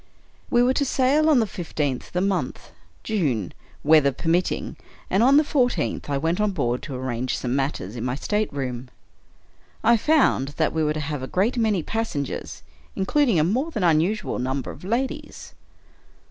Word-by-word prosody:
We 240 -1 +4
were 255 +1 +3
to 285 - +1
sail 280 +4 +2
on 300 - +5
the 225 - +2
fifteenth 150 -9 -3
of - - -22
the 180 - 0
month 195 -1 -2 0.3
(June), 140 - -1 0.3
weather 150 -2 +5
permitting; 165 +7 -1 0.4
and 195 - +3
on 270 +4 +6
the 305 - +6
fourteenth, 245 - 0
I 140 - 0
went 165 +7 0
on 210 -2 +1
board 125 -7 -1
to 140 - -6
arrange 125 -1 -2
some 125 0 -2
matters 135 -7 -2
in 120 - -5
my 125 0 -1
stateroom. 135 - -2 0.9
I 235 +1 +5
found 220 - +2
that 160 - +1
we 160 - 0
were 150 0 +1
to - - -2
have 150 -2 -3
a 130 - -4
great 205 - +1
many 215 -7 +1
passengers, 220 -11 -4 0.3
including 230 - +2
a - - +4
more 250 - 0
than 180 - +2
usual 190 +5 -1
number 130 +2 -2
of 145 - -13
ladies. 235 +8 -3
170 Hz, 175 wpm, -24 LUFS, 140-225 Hz, 0.9 s, on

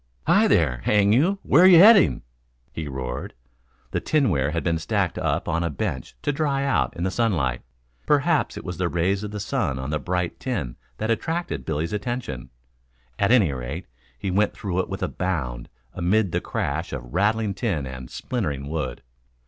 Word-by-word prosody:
"Hi - - +4
there, 65 -7 +2
hang 105 -1 +4
you, 170 - +3
where 170 +7 +6
you 180 -3 +9
heading?" 200 +2 +7 0.5
he 80 -2 -5
roared. 65 -2 -5 0.6
The - - 0
tinware 95 - +1
had 85 +2 -2
been 85 -2 0
stacked 80 - -1
up - - -1
on 85 +1 0
a 85 - 0
bench 65 -3 -4
to 145 - +1
dry 140 -2 0
out 140 -10 0
in 85 - -3
the 95 - 0
sunlight. 85 - 0 0.5
Perhaps 150 +2 +2
it - - -8
was 90 -3 -5
the 90 0 0
rays 95 +4 0
of 105 - -4
the 105 0 -5
sun 65 -8 -1
on 65 +2 -4
the 75 - 0
bright 90 0 -2
tin 95 - -3 0.2
that 110 +1 -1
attracted 115 - -2
Billy's 80 +3 -2
attention. 105 - -4 0.7
At 100 - +3
any 105 - +5
rate 65 +8 -5 0.3
he 95 +10 -3
went 100 +3 +1
through 95 -3 -3
it - - -1
with - - -4
a - - +1
bound, 70 -10 -3 0.2
amid 95 +2 +1
the - - 0
crash 80 +4 -3
of 60 -2 -7
rattling 105 +2 +1
tin 95 - -2
and 65 -1 -8
splintering 75 - -3
wood. 75 -7 -4
90 Hz, 180 wpm, -24 LUFS, 70-115 Hz, 0.7 s, you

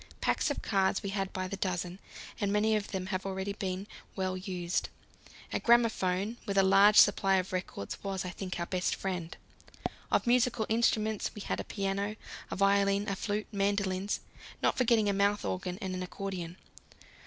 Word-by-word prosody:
Packs - - +1
of 285 - -3
cards 195 -2 +1
we 200 - -3
had 195 -1 -2
by 185 0 -3
the 200 - -4
dozen, 180 -1 -2 0.4
and 200 -1 0
many 215 +1 +3
of 210 -1 -1
them 190 -2 -3
have 185 - -1
already 195 +1 -3
been 190 -1 -3 0.3
well 185 -1 -1
used. 180 -2 -2 0.6
A - - +1
gramophone 225 -3 +2
with 200 -1 -1
a 195 - +6
large 195 +2 +6
supply 195 -2 +6
of 185 0 -1
records 180 - -4
was, 195 -2 -2
I 180 - -3
think, 185 0 -5
our 170 - -1
best 180 0 0
friend. 180 -4 -4 0.7
Of - - +3
musical 240 -2 +3
instruments 220 -2 +1
we 210 - -7
had - - -2
a - - -2
piano, 200 +1 -2 0.3
a - - -3
violin, 200 +1 +3
a 200 - -1
flute, 210 +2 -2
mandolins, 200 -1 0 0.4
not - - +2
forgetting 235 -4 +3
a 200 - +2
mouth 200 +1 +2
organ 180 0 -3
and 190 -1 -3
an 185 - -3
accordion. 180 -2 -5
195 Hz, 175 wpm, -31 LUFS, 185-205 Hz, 0.7 s, a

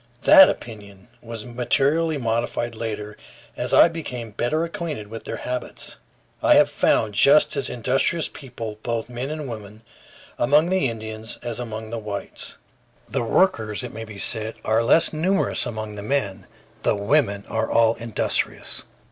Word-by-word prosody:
That 290 -1 +9
opinion 105 -2 -8
was 115 -2 -8
materially 140 +6 +1
modified 120 -1 -1
later, 105 -2 -5 0.4
as - - -3
I - - +8
became 125 -9 -6
better 135 +10 0
acquainted 165 -10 -5
with 115 +1 -8
their - - -4
habits. 125 0 -5 0.4
I - - +5
have - - +5
found 110 -2 +2
just 140 +10 +5
as 140 -2 0
industrious 135 +7 +1
people, 115 -6 -8
both 115 0 -3
men 125 +3 -4
and 155 -2 -5
women, 110 -2 -9 0.6
among 150 +8 +3
the 185 -9 +2
Indians 110 0 -6
as 120 -1 -4
among 110 -2 -6
the 115 - -3
whites. 105 -2 -6 0.5
The - - -2
workers, 115 - +1
it 125 - -7
may 115 - -6
be 110 -2 -10
said, 110 +2 -2
are 110 +1 +3
less 140 +9 +4
numerous 180 -1 +1
among 110 -2 -5
the 105 - -7
men; 105 -6 -2 0.3
the - - +2
women 100 -1 +1
are 110 0 -1
all 115 -1 +4
industrious. 115 -2 -2
115 Hz, 155 wpm, -23 LUFS, 110-140 Hz, 0.6 s, That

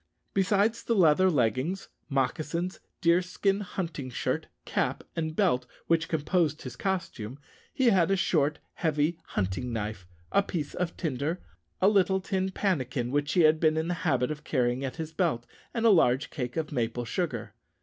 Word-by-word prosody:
Besides 205 +3 +2
the 230 - 0
leather 185 0 +5
leggings, 140 - 0 0.2
moccasins, 155 +6 -1 0.2
deerskin 180 +3 +2
hunting 170 -8 -4
shirt, 125 - -2 0.2
cap, - - -1
and 160 -1 -2
belt 145 -11 +2 0.2
which 165 0 +2
composed 160 0 +1
his 125 -2 -7
costume, 135 - -3 0.3
he 255 -3 +3
had 185 -4 +4
a 195 - +4
short 150 -5 +2 0.2
heavy 160 +1 0
hunting 100 +6 -2
knife, 105 -5 -4 0.2
a 200 - +5
piece 165 -7 -4
of 180 -1 -3
tinder, 155 +2 -2 0.4
a 190 - +4
little 195 -2 +4
tin 190 0 -1
pannikin, 130 - -1
which 145 +1 0
he 180 - +4
had 155 0 +5
been 155 -1 +3
in 160 +2 0
the - - +1
habit 130 -5 +1
of 150 0 -6
carrying 125 -3 0
at 130 -2 -3
his 160 -1 -5
belt, 155 -9 0 0.3
and 230 -1 -1
a 225 - +8
large 135 -7 +3
cake 125 -3 -4
of 160 -1 -2
maple 120 -2 -1
sugar. 130 - -3
160 Hz, 165 wpm, -28 LUFS, 130-185 Hz, 0.4 s, a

